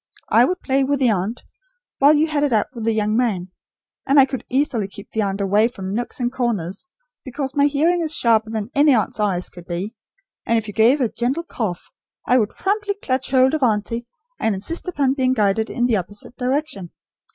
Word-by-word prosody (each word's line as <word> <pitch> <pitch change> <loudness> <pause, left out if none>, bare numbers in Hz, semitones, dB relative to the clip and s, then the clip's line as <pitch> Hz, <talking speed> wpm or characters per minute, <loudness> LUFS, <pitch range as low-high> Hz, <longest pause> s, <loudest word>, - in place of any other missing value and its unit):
I 235 +2 +5
would 365 +6 -2
play 270 0 +1
with 280 +1 0
the 250 -4 +3
aunt, 205 +4 -2 0.6
while 285 +2 +6
you 300 +1 +3
had 305 -2 -1
it 290 - +1
out 220 -2 +3
with 230 -3 -6
the 225 - +2
young 215 -1 0
man. 200 -7 0 0.6
And 280 +1 +5
I 270 - +8
could 265 -3 -5
easily 250 -6 0
keep 200 +1 -12
the 220 - -1
aunt 195 -1 -2
away 205 +3 +3
from 195 -5 -6
nooks 240 +4 -3
and 245 -1 0
corners, 230 - -3 0.3
because 265 0 -4
my 285 0 +4
hearing 325 +5 +2
is 315 -2 -2
sharper 225 -2 +2
than 220 +1 -4
any 285 -1 +5
aunt's 215 -1 -1
eyes 190 -4 0
could 175 -1 -13
be, 185 +5 -4 0.5
and 230 - +1
if 225 -1 -2
you 210 - -6
gave 235 +7 +4
a 245 - +3
gentle 250 +9 -2
cough, 215 - -5 0.3
I 250 +1 +4
would 210 -2 +1
promptly 405 - -1
clutch 260 -9 -2
hold 260 +1 +4
of 310 - 0
auntie, 230 0 0 0.3
and 220 -2 +1
insist 325 - -4
upon 280 -7 +1
being 260 -2 +1
guided 215 -1 +1
in 245 - 0
the 235 -3 +2
opposite 205 +6 -7
direction. 255 - -2
240 Hz, 210 wpm, -21 LUFS, 210-275 Hz, 0.6 s, I